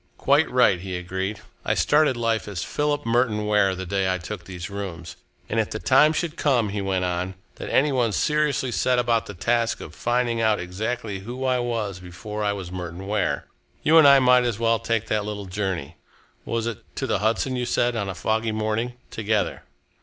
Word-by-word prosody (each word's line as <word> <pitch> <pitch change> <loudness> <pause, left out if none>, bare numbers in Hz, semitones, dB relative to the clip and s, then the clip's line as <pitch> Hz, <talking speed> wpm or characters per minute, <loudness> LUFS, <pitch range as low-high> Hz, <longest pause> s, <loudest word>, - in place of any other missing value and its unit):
"Quite 145 +3 +3
right," 125 -8 +4
he 95 -1 -4
agreed. 95 +3 -4 0.2
"I - - 0
started 150 -4 +3
life 115 -2 0
as 100 -5 -4
Philip 145 0 -1
Merton 115 -2 +1
Ware 105 -2 +3
the 95 +1 -5
day 95 0 0
I 95 - 0
took 95 +4 -7
these 90 -2 -6
rooms, 95 -5 -6 0.3
and 115 - -1
if 110 - 0
the - - -4
time 135 +6 +5
should 160 0 -2
come," 125 -7 +2
he 100 0 -3
went 95 -1 0
on, 90 +1 -2 0.2
"that - - -6
any 145 +2 +3
one 120 -4 +1
seriously 150 +1 +1
set 125 +5 +1
about 120 -2 +1
the 100 - -8
task 115 +5 0
of - - -9
finding 120 -1 0
out 110 -1 +2
exactly 105 +3 -3
who 120 +6 -5
I 130 -1 +2
was 115 -6 -2
before 105 +4 -6
I 105 - +2
was 95 -3 -6
Merton 90 0 -6
Ware, 105 +2 -1 0.4
you 160 +1 +6
and 150 - +8
I 140 0 +8
might 125 -1 +5
as 120 -4 -1
well 115 0 +2
take 115 -1 -1
that 105 -1 0
little 105 -1 -5
journey 95 -5 -3 0.5
was 115 -1 -2
it 115 -3 -4
to - - -2
the - - 0
Hudson, 115 +5 0
you 125 -1 -2
said, 120 0 +1
on 100 -3 -2
a 95 - -4
foggy 110 +3 0
morning? 110 +3 -1 0.2
together." 110 -1 -1
110 Hz, 205 wpm, -24 LUFS, 95-125 Hz, 0.5 s, and